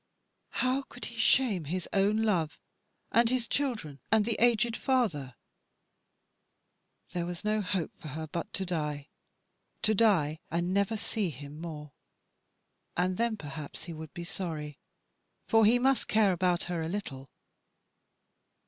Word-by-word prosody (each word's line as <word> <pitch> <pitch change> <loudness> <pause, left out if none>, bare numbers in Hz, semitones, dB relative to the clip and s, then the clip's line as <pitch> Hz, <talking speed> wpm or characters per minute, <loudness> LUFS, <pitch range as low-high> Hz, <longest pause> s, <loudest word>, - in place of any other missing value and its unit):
How 260 +2 +2
could 250 -2 -8
he 235 - -8
shame 220 - +3
his 180 +4 -2
own 205 +3 +3
love 175 -8 +1
so, - - -5
and 235 -1 +5
his 250 -2 +1
children, 220 - -1
and 215 -1 +5
the 230 -1 0
aged 235 -1 +3
father 175 - 0 1.8
there 175 -1 -2
was 175 +3 -5
no 215 0 +2
hope 185 -3 -1
for - - -7
her 155 +2 -4
but 165 +2 -4
to 190 - -1
die 150 -4 -2 0.7
to 215 - +4
die 180 -9 +3
and 175 +2 0
never 200 +3 +2
see 210 -2 -1
him 145 +1 -9
more; 150 -3 -6 1.1
and 180 +1 +1
then 230 -1 +1
perhaps 145 -3 -7
he 170 - -6
would 160 -1 -8
be 175 - -5
sorry, 155 -5 -5 0.7
for 225 -2 +5
he 230 +4 +6
must 265 +1 +2
care 215 -2 +4
about 180 0 +1
her 175 -2 -2
a 160 - -2
little." 140 -9 -5
185 Hz, 150 wpm, -30 LUFS, 155-220 Hz, 1.8 s, he